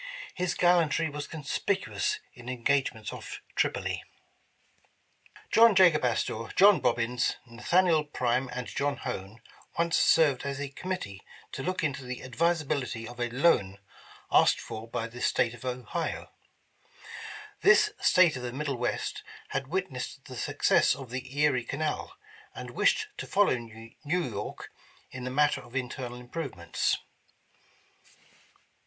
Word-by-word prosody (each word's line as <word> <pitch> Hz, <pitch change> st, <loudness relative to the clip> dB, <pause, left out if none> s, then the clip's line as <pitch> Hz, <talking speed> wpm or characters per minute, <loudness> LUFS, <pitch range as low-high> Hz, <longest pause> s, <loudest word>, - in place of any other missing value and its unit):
His 180 Hz, -1 st, -1 dB
gallantry 170 Hz, -3 st, +3 dB
was 145 Hz, 0 st, -5 dB
conspicuous 195 Hz, -, -1 dB, 0.2 s
in 120 Hz, -1 st, -10 dB
engagements 125 Hz, -3 st, 0 dB
off -, -, -7 dB, 0.2 s
Tripoli. -, -, 0 dB, 1.5 s
John 230 Hz, -2 st, +7 dB
Jacob 175 Hz, -6 st, +6 dB
Astor, 115 Hz, -2 st, 0 dB
John 200 Hz, 0 st, +7 dB
Bobbins, 120 Hz, +1 st, +1 dB
Nathaniel 155 Hz, +7 st, +2 dB
Prime, 130 Hz, -2 st, 0 dB
and 125 Hz, -1 st, -4 dB
John 140 Hz, +3 st, -1 dB
Hone, 110 Hz, -3 st, -6 dB, 0.4 s
once 170 Hz, 0 st, +2 dB
served 150 Hz, -6 st, +4 dB
as 140 Hz, 0 st, -4 dB
a 145 Hz, -1 st, -3 dB
committee 140 Hz, -, -5 dB, 0.3 s
to -, -, -5 dB
look 185 Hz, +4 st, -2 dB
into 140 Hz, -3 st, -1 dB
the 125 Hz, 0 st, -6 dB
advisability 140 Hz, -4 st, -1 dB
of 120 Hz, +1 st, -10 dB
a 120 Hz, 0 st, 0 dB
loan 120 Hz, -, +2 dB, 0.5 s
asked -, -, +5 dB
for 110 Hz, +1 st, -7 dB
by 115 Hz, 0 st, -3 dB
the 120 Hz, +1 st, -9 dB
State 120 Hz, -2 st, +2 dB
of 120 Hz, +1 st, -11 dB
Ohio. 125 Hz, -3 st, -3 dB, 1.3 s
This -, -, +6 dB
State 175 Hz, -5 st, +5 dB
of 130 Hz, -, -5 dB
the 125 Hz, -1 st, -4 dB
middle 140 Hz, 0 st, -3 dB
west, 120 Hz, 0 st, -2 dB, 0.3 s
had 135 Hz, -1 st, -2 dB
witnessed 140 Hz, -6 st, -4 dB
the 130 Hz, -, -9 dB
success -, -, +3 dB
of 130 Hz, -3 st, -10 dB
the 130 Hz, +2 st, -6 dB
Erie 145 Hz, -5 st, +3 dB
Canal, 155 Hz, -, -3 dB, 0.4 s
and -, -, -7 dB
wished 465 Hz, -3 st, +2 dB
to -, -, -5 dB
follow 205 Hz, -8 st, +3 dB
New 115 Hz, -1 st, -10 dB
York 145 Hz, -, -3 dB, 0.4 s
in 130 Hz, -1 st, -6 dB
the -, -, -2 dB
matter 145 Hz, +3 st, +2 dB
of 120 Hz, +1 st, -15 dB
internal 125 Hz, -1 st, -4 dB
improvements. 125 Hz, -, -2 dB
135 Hz, 135 wpm, -29 LUFS, 120-160 Hz, 1.5 s, John